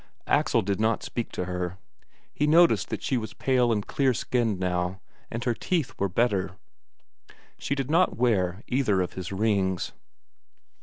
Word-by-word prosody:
Axel - - +2
did 100 +1 -1
not 110 0 +1
speak 120 - -4
to 90 - -2
her. 90 0 -3 0.6
He 150 - 0
noticed 165 +3 +5
that - - -4
she 135 - 0
was 110 -2 -5
pale 125 -3 +2
and 105 -3 0
clear 135 -3 +1
skinned 115 -6 0
now, 90 0 -1 0.3
and 115 +1 -4
her 120 - +1
teeth 165 +4 -1
were 100 - +1
better. 100 -1 0 1.0
She 140 - -1
did 135 +1 -3
not 180 +3 +3
wear 100 -5 +1
either 110 -8 +2
of 90 - -6
his 95 -1 -6
rings.... 95 -3 0
110 Hz, 160 wpm, -26 LUFS, 95-125 Hz, 1.0 s, noticed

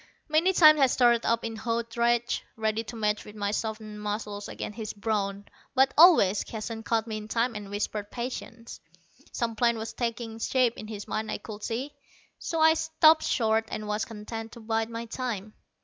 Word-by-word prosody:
Many 320 +4 +3
times 310 -4 +7
I 270 - +6
started 240 -2 +3
up 230 0 +1
in 225 0 -4
hot 230 0 -3
rage, 235 0 +1
ready 220 0 -1
to 235 - -8
match 210 -1 0
my 205 -1 -1
softened 215 -1 -4
muscles 210 -1 -4
against 210 - -6
his 220 -2 -4
brawn. 200 -2 -2 0.3
But 265 +1 +4
always 300 - +6
Keston 225 0 -6
caught 225 -1 0
me 220 -2 -4
in 210 0 -7
time 235 +2 0
and 210 -2 -7
whispered 205 0 -3
patience. 235 -1 -6 0.5
Some 230 -2 -2
plan 235 0 +2
was 225 +1 -5
taking 230 -2 -4
shape 250 0 +2
in 215 - -8
his 210 -2 -7
mind, 215 0 -3
I - - -2
could 210 -1 -9
see, 255 +5 -3 0.5
so 330 - -3
I 320 0 +6
stopped 320 0 +4
short, 225 -1 +1
and 215 0 -5
was 210 +1 -1
content 225 0 -7
to - - -10
bide 225 0 -1
my 230 0 -5
time. 225 -4 -4
225 Hz, 185 wpm, -27 LUFS, 215-240 Hz, 0.5 s, times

